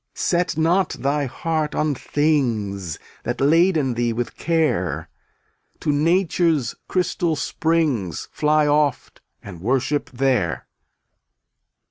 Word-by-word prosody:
Set 175 -3 0
not 170 +4 +2
thy 140 +1 -1
heart 155 +3 -2
on 150 -1 +1
things 115 - -1 0.2
That 120 - -3
laden 155 -2 +3
thee 120 0 0
with 120 +1 -3
care; 155 - 0 0.7
To 150 - +1
nature's 165 - +2
crystal 175 -2 0
springs 150 - -1
Fly 150 0 +2
oft 145 -2 0 0.2
and 90 -5 -10
worship 135 +6 0
there. 125 -9 0
145 Hz, 100 wpm, -22 LUFS, 120-160 Hz, 0.7 s, laden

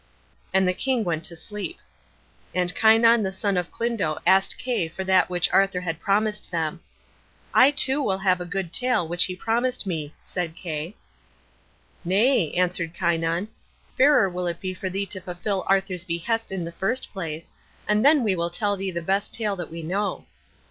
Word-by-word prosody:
And 190 -1 +3
the 180 - +2
king 255 +3 0
went 165 -4 -2
to 170 - -7
sleep. 210 - -6 0.8
And 180 0 +2
Kynon 225 +1 +5
the 190 -2 -1
son 195 +1 -1
of 180 -1 -1
Clydno 230 -10 -1
asked 190 +2 +3
Kay 245 -10 -1
for 175 +4 -6
that 190 -1 +3
which 175 -1 +1
Arthur 195 -2 +3
had 165 -2 -4
promised 210 +3 0
them. 165 0 -2 0.7
"I 255 - +7
too 275 0 +3
will 190 -8 0
have 185 -2 +2
the 180 - -5
good 180 -2 -4
tale 250 -9 +1
which 175 +2 +3
he 185 - -4
promised 240 +4 0
me," 155 -5 -4
said 175 -3 -4
Kay. 165 +2 -5 1.1
"Nay," 195 - +2
answered 175 -2 0
Kynon; 170 +2 0 0.5
"fairer 275 -6 +5
will 180 -1 -3
it 170 0 -3
be 185 -1 -4
for 185 +1 -4
thee 195 +2 -2
to 190 0 -7
fulfil 185 +2 -3
Arthur's 195 -2 +1
behest 190 +6 -2
in 185 -3 -3
the 170 - -6
first 195 +9 -2
place, 165 -5 -6 0.3
and 210 +1 +2
then 290 -1 +5
we 205 -4 +1
will 170 0 -1
tell 205 +3 -1
thee 195 0 -3
the 170 -2 -4
best 195 +4 0
tale 210 -3 -1
that 175 -3 -6
we 165 0 -7
know." 195 +5 -2
190 Hz, 185 wpm, -24 LUFS, 175-210 Hz, 1.1 s, I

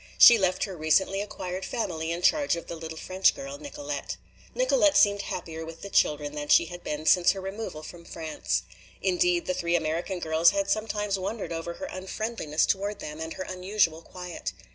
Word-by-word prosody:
She 235 -2 +9
left 185 -1 +1
her 195 -3 -4
recently 175 +5 +2
acquired 185 -2 -5
family 165 -9 -3
in 170 +1 -3
charge 290 - +3
of 170 - -7
the 170 - -6
little 160 0 -7
French 185 +3 +2
girl, 275 +1 -7
Nicolete. 290 0 -5 0.4
Nicolete - - +4
seemed 200 -1 +5
happier 160 -4 -5
with 165 0 -10
the 200 - -7
children 150 -1 +2
than 150 -1 -5
she 170 - +6
had 175 +1 -9
been 150 +1 -4
since 175 +2 +5
her 195 - -6
removal 190 -5 -6
from 170 +2 -10
France. 160 -2 -3 0.4
Indeed, 355 -1 +2
the 275 - 0
three 170 -9 0
American 165 +3 -1
girls 160 0 +4
had 200 0 0
sometimes 210 -2 -1
wondered 195 +2 -4
over 165 +1 -4
her - - -6
unfriendliness 190 - -2
toward 200 +1 -1
them 150 +1 -7
and 160 0 -4
her 185 - -5
unusual 185 -3 0
quiet. 180 0 -7
185 Hz, 185 wpm, -27 LUFS, 165-210 Hz, 0.4 s, She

